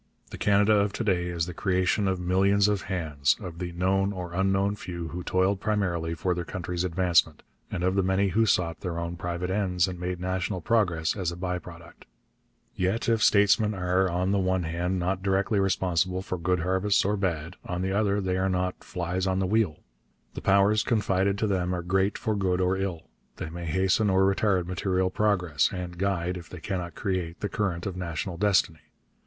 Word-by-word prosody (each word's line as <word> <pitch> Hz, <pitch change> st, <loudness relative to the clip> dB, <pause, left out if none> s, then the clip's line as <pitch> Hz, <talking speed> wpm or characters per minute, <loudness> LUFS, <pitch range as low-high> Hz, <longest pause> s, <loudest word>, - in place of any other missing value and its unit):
The -, -, -7 dB
Canada 105 Hz, +1 st, +4 dB
of 100 Hz, 0 st, +1 dB
to -, -, -3 dB
day 90 Hz, -5 st, +1 dB
is 85 Hz, -1 st, -1 dB
the 90 Hz, -, -6 dB
creation 95 Hz, +2 st, +1 dB
of 95 Hz, -1 st, 0 dB
millions 95 Hz, +3 st, +3 dB
of 105 Hz, -2 st, 0 dB
hands, 75 Hz, -7 st, +1 dB
of 85 Hz, -2 st, -8 dB
the 90 Hz, -1 st, -4 dB
known 95 Hz, +3 st, +1 dB
or 90 Hz, -3 st, -6 dB
unknown 95 Hz, +2 st, +1 dB
few 85 Hz, -4 st, -6 dB
who 90 Hz, +2 st, -5 dB
toiled 95 Hz, +2 st, +1 dB
primarily 90 Hz, -6 st, -1 dB
for 90 Hz, +3 st, 0 dB
their 90 Hz, 0 st, -3 dB
country's 90 Hz, 0 st, -4 dB
advancement, 85 Hz, -3 st, +2 dB, 0.3 s
and 90 Hz, -, -3 dB
of 95 Hz, +1 st, +2 dB
the 100 Hz, -, +2 dB
many 95 Hz, +1 st, +1 dB
who 110 Hz, +4 st, +2 dB
sought 85 Hz, -4 st, +1 dB
their 90 Hz, -3 st, -4 dB
own 85 Hz, 0 st, -3 dB
private 85 Hz, +1 st, -3 dB
ends 95 Hz, -3 st, +1 dB
and 90 Hz, -1 st, -6 dB
made 90 Hz, 0 st, -3 dB
national 95 Hz, +1 st, -2 dB
progress 90 Hz, -5 st, +1 dB
as 90 Hz, -4 st, -2 dB
a -, -, -6 dB
by 90 Hz, 0 st, -3 dB
product. 85 Hz, -1 st, -13 dB, 0.7 s
Yet 95 Hz, +5 st, -1 dB
if 115 Hz, -2 st, +2 dB
statesmen 105 Hz, +1 st, +4 dB
are, 90 Hz, 0 st, +1 dB
on 90 Hz, +2 st, 0 dB
the 100 Hz, -, +2 dB
one 95 Hz, -1 st, +1 dB
hand, 85 Hz, +3 st, -2 dB
not 90 Hz, +1 st, -1 dB
directly 100 Hz, +2 st, +1 dB
responsible 95 Hz, -1 st, 0 dB
for 95 Hz, -, -3 dB
good 90 Hz, +1 st, 0 dB
harvests 95 Hz, +3 st, +2 dB
or 105 Hz, +2 st, +1 dB
bad, 85 Hz, -3 st, -2 dB
on 90 Hz, +1 st, -3 dB
the 95 Hz, -, -1 dB
other, 100 Hz, 0 st, +1 dB
they 95 Hz, -2 st, -1 dB
are 95 Hz, +1 st, +1 dB
not 90 Hz, 0 st, -2 dB
'flies 90 Hz, +2 st, -2 dB
on 95 Hz, 0 st, +1 dB
the 95 Hz, -, +1 dB
wheel.' 100 Hz, -5 st, +1 dB, 0.5 s
The -, -, -6 dB
powers 100 Hz, +2 st, +4 dB
confided 100 Hz, -3 st, +1 dB
to 110 Hz, -, 0 dB
them 90 Hz, -3 st, 0 dB
are 90 Hz, -, -4 dB
great 95 Hz, +3 st, +1 dB
for 110 Hz, -, -1 dB
good 95 Hz, -2 st, 0 dB
or 90 Hz, 0 st, +2 dB
ill. 95 Hz, -4 st, -3 dB, 0.3 s
They 80 Hz, -, -6 dB
may 85 Hz, +1 st, -6 dB
hasten 95 Hz, +5 st, +2 dB
or 95 Hz, 0 st, +3 dB
retard 95 Hz, -2 st, +2 dB
material 95 Hz, +1 st, 0 dB
progress, 90 Hz, -9 st, +1 dB
and 90 Hz, -1 st, -5 dB
guide, 90 Hz, -2 st, -1 dB
if 85 Hz, -2 st, -10 dB
they 90 Hz, -, -9 dB
cannot 90 Hz, -2 st, -4 dB
create, 90 Hz, -4 st, -3 dB
the 105 Hz, -, -2 dB
current 95 Hz, -5 st, -2 dB
of 95 Hz, -, -3 dB
national 85 Hz, 0 st, -4 dB
destiny. 95 Hz, -5 st, +2 dB
95 Hz, 200 wpm, -27 LUFS, 90-100 Hz, 0.7 s, Canada